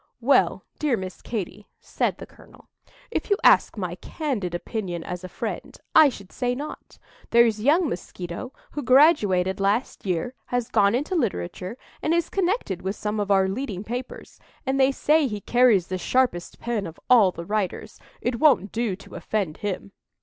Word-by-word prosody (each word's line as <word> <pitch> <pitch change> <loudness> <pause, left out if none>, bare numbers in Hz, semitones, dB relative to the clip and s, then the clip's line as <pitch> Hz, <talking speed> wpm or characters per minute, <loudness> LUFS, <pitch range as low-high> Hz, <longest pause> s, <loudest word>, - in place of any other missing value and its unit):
"Well 255 +4 +3 0.2
dear 290 -6 +1
Miss 185 -1 -7
Katy," 210 -2 -5
said - - -1
the - - -8
colonel, - - -19 0.4
"if - - -2
you 405 - +3
ask - - +5
my - - -3
candid 230 - -3
opinion 175 -3 -4
as 180 0 -6
a 185 - -7
friend, - - -5 0.2
I 310 -2 +8
should 200 -7 -11
say 245 -1 -1
not. 290 +4 -8 0.3
There's 230 -2 +4
young 310 +8 +4
Mosquito, 180 +3 -6 0.2
who 295 - -4
graduated 230 - +4
last 205 +6 0
year, 185 +5 -2
has 245 -2 -1
gone 200 +2 +3
into 290 +9 -2
literature, 180 - -2 0.2
and 320 +2 +1
is 340 -1 0
connected 370 - -1
with 190 +2 -3
some 210 +1 -3
of 205 -1 -2
our 195 -1 +4
leading 200 -2 -4
papers, 245 +4 -7 0.3
and 270 0 0
they 265 0 +5
say 300 +2 +2
he 210 -4 -4
carries 240 -5 +4
the 185 0 -4
sharpest 250 -7 0
pen 230 -5 -2
of 165 - -11
all 220 -7 +6
the 170 -1 -8
writers. 205 -2 -3 0.2
It 240 -1 -1
won't 260 -10 +4
do 225 -4 -1
to 195 - -15
offend 195 -8 -2
him." 200 -1 -4
215 Hz, 170 wpm, -24 LUFS, 190-260 Hz, 0.4 s, I